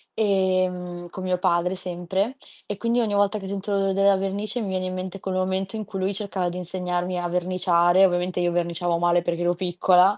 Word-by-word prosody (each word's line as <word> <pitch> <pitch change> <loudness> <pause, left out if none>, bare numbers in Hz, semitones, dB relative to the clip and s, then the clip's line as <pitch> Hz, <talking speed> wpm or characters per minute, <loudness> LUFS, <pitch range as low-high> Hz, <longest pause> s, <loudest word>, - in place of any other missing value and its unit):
ehm, 185 -4 0
con 185 +2 -7
mio 185 -1 +1
padre 180 +1 +1
sempre, 185 +6 -2 0.3
e 205 - -4
quindi 235 +3 +1
ogni 215 -3 0
volta 205 +1 +2
che 195 -2 -7
sentivo 200 +1 -2
l'odore 195 0 +1
della 195 0 +4
vernice 200 +5 -2
mi 205 - -3
viene 185 0 -1
in 185 - -4
mente 185 +1 -5
quel 190 0 -3
momento 190 +2 -1
in 215 -1 -4
cui 195 - -6
lui 190 +2 0
cercava 195 -3 -2
di 175 - -6
insegnarmi 180 0 -2
a 175 - -2
verniciare, 180 0 +3
ovviamente 180 0 0
io 175 0 +1
verniciavo 170 0 0
male 175 0 +3
perché 175 0 -2
ero 175 0 +2
piccola, 180 +2 +3
185 Hz, 205 wpm, -24 LUFS, 175-195 Hz, 0.3 s, della